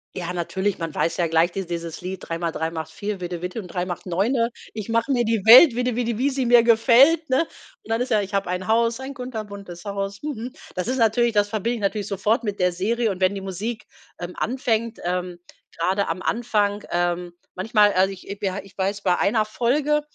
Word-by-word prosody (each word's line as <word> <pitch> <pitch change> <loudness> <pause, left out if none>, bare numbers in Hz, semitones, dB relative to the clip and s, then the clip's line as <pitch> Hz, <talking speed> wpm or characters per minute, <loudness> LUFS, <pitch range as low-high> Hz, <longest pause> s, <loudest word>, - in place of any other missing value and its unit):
Ja, 180 -1 -4
natürlich, 190 +3 -2
man 165 -2 -4
weiß 165 - 0
ja 175 - +1
gleich 165 +2 +2
dies 195 -2 -4
dieses 170 -1 -5
Lied 185 +1 -5
3 165 - -3
mal 170 -1 -2
3 160 0 -2
macht 160 -1 -6
4, 200 +2 -5
Vidde 175 -1 -4
Vidde 180 +5 -4
und 185 - -11
3 180 +1 -2
mal 175 -2 -4
9. 230 +7 0 0.2
Ich 215 0 -6
mache 230 +3 +1
mir 240 -2 +2
die 225 -3 0
Welt, 250 +5 +10
Vidde 245 0 -1
Vidde, 235 -2 -1
wie 265 +4 +2
sie 265 -2 -1
mir 240 -1 +6
gefällt, 260 +8 +5
ne? 260 +5 +3 0.4
Und - - -17
dann 225 +1 0
ist 255 - -2
ja, 215 - +4
ich 200 0 -4
habe 195 -2 0
ein 180 +1 -3
Haus, 230 +1 +2
ein 265 +1 -6
kunterbuntes 205 -8 -7
Haus, 200 0 -4
mhm. 255 -5 -5 0.2
Das 180 +5 -2
ist 260 - 0
natürlich 235 0 +3
das 205 -2 +2
verbinde 220 +3 -1
ich - - -5
natürlich 200 0 -1
sofort 210 +4 0
mit 205 -2 -3
der 180 -1 +2
Serie. 225 +6 0
Und 190 -2 -5
wenn 185 +1 +3
die - - -3
Musik, 195 +4 -5 0.3
ähm, 175 0 -6
anfängt, 230 -2 -1
ähm, 180 0 -2 0.4
gerade 190 +4 0
am 170 +3 -3
Anfang, 210 -3 0
ähm 175 0 -1 0.2
manchmal, 205 +1 +3
also 190 +1 +3
ich 190 -1 -10 0.2
we 195 - 0
ha 190 - -4
ich 195 - -18
weiß, 200 +1 -2
bei 180 -2 +2
einer 215 +1 +2
Folge, 275 +7 +1
205 Hz, 225 wpm, -23 LUFS, 180-235 Hz, 0.4 s, Welt